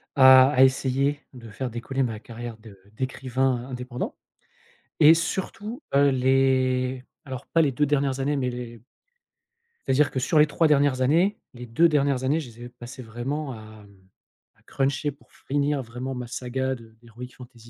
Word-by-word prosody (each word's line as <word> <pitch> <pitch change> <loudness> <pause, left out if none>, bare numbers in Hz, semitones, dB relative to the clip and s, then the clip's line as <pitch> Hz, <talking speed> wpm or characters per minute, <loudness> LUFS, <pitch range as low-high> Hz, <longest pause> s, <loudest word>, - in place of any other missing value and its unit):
à 130 0 +7
essayer 135 +2 +1 0.2
de 115 -3 -11
faire 125 +5 -4
décoller 120 +3 -4
ma 115 -4 -2
carrière 115 0 -8
de 105 -3 -15 0.2
d'écrivain 130 -1 -2
indépendant 125 - -5 0.8
et 160 0 +8
surtout, 205 - -4
heu, 140 0 +5
les 130 -1 +1 0.2
alors 130 -3 -7
pas 165 - +2
les 145 - +2
2 150 +4 +1
dernières 140 -2 0
années 140 +2 0
mais 130 -3 -1
les 120 -2 -8 1.1
c'est - - +1
à - - +3
dire 150 +1 +3
que 130 - -2
sur 150 +5 +2
les 150 - +6
3 160 +2 +2
dernières 140 -3 +2
années, 170 +10 +2 0.2
les 125 -1 -10
2 140 +9 +4
dernières 140 -4 +1
années, 145 +5 +1
je 145 -6 -7
les 120 +1 -13
ai - - -9
passé 125 +1 -11
vraiment 135 +6 -4
à, 110 - -10 0.2
hem, 100 -2 -21 0.5
à - - -31
cruncher 140 +2 -1
pour 140 - -23
finir 145 0 -2
vraiment 125 +3 -6
ma 125 0 -5
saga 130 +2 -3
de 115 -2 -16
d'heroic 120 +2 -10
fantasy 120 -2 -14
130 Hz, 175 wpm, -25 LUFS, 120-140 Hz, 1.1 s, et